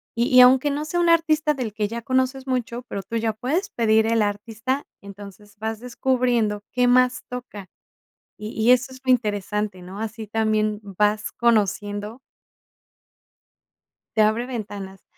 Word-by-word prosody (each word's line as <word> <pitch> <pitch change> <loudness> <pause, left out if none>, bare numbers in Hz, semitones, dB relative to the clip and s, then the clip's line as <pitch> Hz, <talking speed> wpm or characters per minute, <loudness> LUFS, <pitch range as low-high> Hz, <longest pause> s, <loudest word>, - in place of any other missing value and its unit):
y 235 +1 +1
y - - +11
aunque 260 +3 +6
no 295 +2 -3
sea 350 +3 -2
un 345 -1 +3
artista 315 -2 +3
del 240 -6 -4
que 210 -1 -1
ya 235 +2 -5
conoces 260 +2 -1
mucho, 250 -1 -2
pero, 200 - -4
tú 230 - -7
ya 225 -1 0
puedes 280 - -2
pedir 220 -1 +2
el 225 0 +2
artista, 225 +6 -3 0.2
entonces 200 +1 -12
vas 220 0 -3
descubriendo 245 -4 0
qué 250 -1 +2
más 250 0 +3
toca, 240 -6 -8 0.7
y 210 0 -6
y 235 - +5
eso 255 +1 +3
es 260 - -11
lo 255 - +4
interesante, 210 -4 -1
¿no? 190 +3 -9
Así 220 0 -5
también 215 -1 0
vas 210 +2 0
conociendo. 210 -1 0 2.0
Te - - +6
abre 220 +3 +2
ventanas, 205 -6 -7
225 Hz, 155 wpm, -23 LUFS, 210-255 Hz, 2.0 s, y